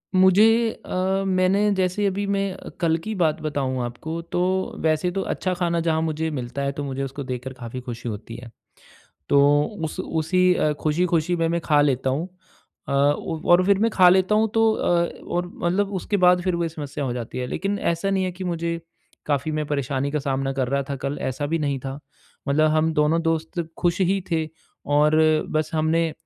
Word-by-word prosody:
मुझे 215 +5 +5 0.2
अ, 190 +1 0
मैंने 190 +2 +2
जैसे 190 +2 0
अभी 200 +1 -1
मैं 195 -1 -1 0.3
कल 165 -1 +3
की 220 - -3
बात 160 -4 +1
बताऊँ 135 -4 -2
आपको 160 +8 -5
तो 175 - 0 0.4
वैसे 155 +2 +1
तो 195 - -2
अच्छा 185 -1 -2
खाना 175 -1 0
जहाँ 160 0 +2
मुझे 160 0 -1
मिलता 125 0 -4
है 140 - 0
तो 145 +1 -5
मुझे 135 -1 -3
उसको 135 +1 -5
देखकर 130 0 -5
काफ़ी 125 0 -7
खुशी 120 -1 -6
होती 110 +2 -7
है। 120 -1 -10 0.8
तो 140 - +4 0.5
उस 160 +4 -5
उसी 170 -2 +1
खुशी-खुशी 170 +2 +1
में 165 - +1
मैं 170 +1 0
खा 150 -3 +3
लेता 135 -2 +1
हूँ। 150 +6 -1 0.6
अ, - - -2
उ 145 +4 +1
और 175 +1 +6
फिर 200 -1 +4
मैं 225 +3 +2
खा 185 -4 +6
लेता 185 +3 +4
हूँ 220 +1 +3
तो 225 -1 +4
अ, 170 -1 +1 0.2
और 175 0 -1
मतलब 195 +4 0
उसके 190 +3 -1
बाद 180 -1 +4
फिर 185 -1 0
वोही 170 -1 0
समस्या 145 -2 -5
हो 125 - -2
जाती 120 0 -5
है 125 - -2
लेकिन 195 +9 -2
ऐसा 170 +1 -1
नहीं 190 -1 +1
है 185 - -2
कि 185 +1 -7
मुझे 170 -1 -2 0.5
काफ़ी 145 +1 0
मैं 155 0 -2
परेशानी 140 -1 -1
का 150 - -1
सामना 135 -1 -1
कर 130 -2 -1
रहा 140 +1 0
था 140 - -2
कल 140 +1 -2
ऐसा 130 +3 -2
भी 165 +3 -1
नहीं 140 -3 -1
था। 135 +1 -6 0.5
मतलब 155 +2 +3
हम 155 +1 +2
दोनों 150 +2 +2
दोस्त 165 +1 -1 0.2
खुश 175 +2 0
ही 190 +1 +2
थे 160 -1 0 0.5
और 150 +1 +4 0.3
बस 155 0 -1
हमने, 160 +1 +1
160 Hz, 195 wpm, -23 LUFS, 140-185 Hz, 0.8 s, और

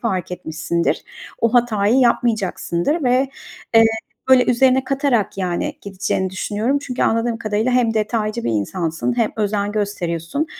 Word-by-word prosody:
fark 185 -6 -2
etmişsindir. 160 0 -2 0.4
O 230 +1 +1
hatayı 225 -2 +3
yapmayacaksındır 235 - +1
ve, 255 +2 +2 0.5
eee, 225 0 +8 0.4
böyle 260 -1 +6
üzerine 260 +1 +3
katarak 265 -8 0
yani 185 +11 -2
gideceğini 190 -1 -2
düşünüyorum. 210 +8 -1
Çünkü 270 -3 -3
anladığım 230 0 +1
kadarıyla 215 +3 0
hem 235 -3 +2
detaycı 215 +1 -1
bir - - 0
insansın 165 - -2
hem 230 -3 +1
özen 205 -1 -1
gösteriyorsun 200 - -2
220 Hz, 130 wpm, -20 LUFS, 190-245 Hz, 0.5 s, eee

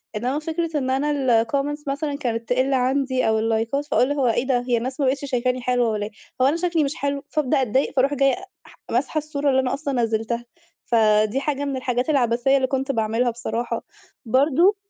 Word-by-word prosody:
إنما 250 +7 -1
فكرة 325 0 -2
إن 260 -2 -1
أنا 265 -4 +2
الcomments 290 +4 -2
مثلًا 280 +1 -2
كانت 230 -5 -3
تقل 260 +2 +2
عندي، 260 -1 +1
أو 220 0 +2
اللايكات 225 +6 0
فأقول 275 -1 +2
هو 275 -4 +1
إيه 240 +3 +1
ده؟ 250 -2 +2
هي 240 -1 +2
الناس 260 +4 -4
ما 275 - +2
بقتش 275 +2 0
شايفاني 255 -1 -1
حلوة 245 -2 +1
والّا 210 -1 -2
إيه؟ 215 - -8 0.3
هو - - +5
أنا 295 - +2
شكلي 340 -3 +1
مش 280 +2 -2
حلو؟ 280 0 -2
فأبدأ 275 -3 +1
أتضايق، 260 +4 0
فاروح 275 +2 +3
جاية 275 +1 +3 0.3
ح - - -17 0.2
ماسحة 270 +6 0
الصورة 295 -2 -1
اللي 265 0 +3
أنا 255 - -1
أصلًا 280 -1 -3
نزلتها. 225 +2 -1 0.4
فدي 215 +1 +3
حاجة 285 0 -2
من 275 -2 -2
الحاجات 250 +2 -1
العبثية 245 -1 +2
اللي 260 -1 +1
كنت 270 +1 -1
باعملها 225 +1 0
بصراحة. 235 0 -3 0.4
برضه 295 - +3
260 Hz, 195 wpm, -23 LUFS, 240-285 Hz, 0.4 s, هو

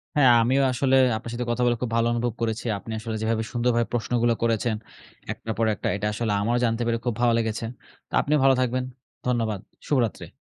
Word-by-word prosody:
হ্যাঁ 135 -4 +6
আমিও 130 +4 +3
আসলে 130 +1 +2 0.2
আপনার 115 +1 -7
সাথে 120 +1 -3
কথা 120 - -1
বলে 120 0 +3
খুব 125 -3 -2
ভালো 115 0 +3
অনুভব 120 0 -1
করেছি। 115 0 -2
আপনি 115 - -9
আসলে 110 0 -4
যেভাবে 110 0 0
সুন্দরভাবে 120 -1 +1
প্রশ্নগুলা 120 0 +1
করেছেন 115 0 +1 0.6
একটার 110 - -5
পর 115 - +2
একটা, - - -4
এটা 105 +1 -2
আসলে 110 0 -1
আমারও 120 +4 +1
জানতে 115 0 0
পেরে 115 0 +1
খুব 120 - +1
ভালো 120 -1 +4
লেগেছে। 115 0 -1 0.4
তো - - -23
আপনিও 150 +1 +2
ভালো 135 0 +6
থাকবেন। 130 0 0 0.4
ধন্যবাদ। 115 -5 0 0.3
শুভরাত্রি। 120 - 0
115 Hz, 195 wpm, -25 LUFS, 115-125 Hz, 0.6 s, হ্যাঁ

